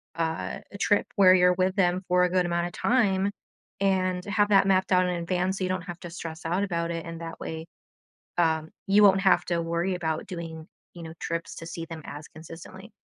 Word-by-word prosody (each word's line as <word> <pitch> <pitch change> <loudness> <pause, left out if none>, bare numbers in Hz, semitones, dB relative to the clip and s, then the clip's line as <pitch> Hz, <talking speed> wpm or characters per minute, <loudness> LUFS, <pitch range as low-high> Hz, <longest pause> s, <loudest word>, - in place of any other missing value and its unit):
uh, 160 -1 -3 0.2
trip 205 -2 +2
where 185 -2 +7
you're 180 0 +5
with 185 +1 0
them 185 -1 +2
for 180 0 +3
a 180 - +3
good 180 0 +2
amount 170 0 0
of 175 - -10
time 200 -5 +2 0.5
and 185 -2 +1
have 205 0 +1
that 195 -1 +5
mapped 190 0 +2
out 185 0 +5
in 180 - 0
advance 180 +2 -1
so - - -2
you 185 - -1
don't 185 -1 -2
have 175 -1 -8
to 175 - -8
stress 165 -2 -7
out 175 +4 0
about 170 -4 -2
it, 165 0 -4
and 165 0 -7
that 165 0 -7
way, 160 +1 -6 0.7
uh, 160 -2 +2 0.3
you 200 +2 +5
won't 195 -1 +6
have 195 - +4
to 170 -1 0
worry 170 +3 -1
about 160 -3 -3
doing, 165 -3 -7 0.3
you 175 - -10
know, 160 - -8
trips 165 0 -4
to 165 - -8
see 165 -2 -6
them 165 -1 -8
as 145 +2 -8
consistently. 165 +6 -12
180 Hz, 215 wpm, -27 LUFS, 165-190 Hz, 0.7 s, where